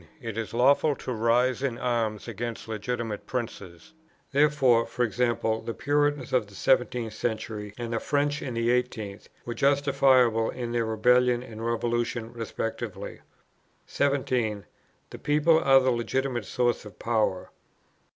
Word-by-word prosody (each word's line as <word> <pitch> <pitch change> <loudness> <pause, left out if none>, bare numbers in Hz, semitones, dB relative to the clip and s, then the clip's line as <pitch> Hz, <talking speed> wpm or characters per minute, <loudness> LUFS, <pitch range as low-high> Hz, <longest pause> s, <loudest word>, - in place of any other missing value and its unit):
It 115 -5 -6
is 115 -1 -4
lawful 140 +5 +3
to 125 - -5
rise 120 +3 +2
in 130 -4 -1
arms 115 -4 -1
against 115 +1 -5
legitimate 110 0 -4
princes. 110 - -6 0.4
Therefore, 135 -5 +4
e.g. 120 -4 -2
the 115 -2 0
Puritans 145 0 0
in 130 - +5
the 105 -1 -15
17th 125 +1 +1
century, 110 -2 -4
and 120 -1 -4
the 115 - 0
French 145 +2 0
in 130 -4 -5
the 115 0 0
18th, 115 -5 -2 0.2
were 120 - -3
justifiable 135 -4 +3
in 120 -2 -4
their 120 -1 0
Rebellion 125 +2 +3
and 110 -2 -9
Revolution 120 0 -1
respectively. 115 -1 -5 0.7
17. 125 -7 0 0.5
The - - -9
people 150 +2 +3
are 135 -2 +6
the 130 0 +2
legitimate 120 0 -1
source 120 -1 0
of 105 -3 -12
power. 110 -5 -1
120 Hz, 135 wpm, -27 LUFS, 115-130 Hz, 0.7 s, are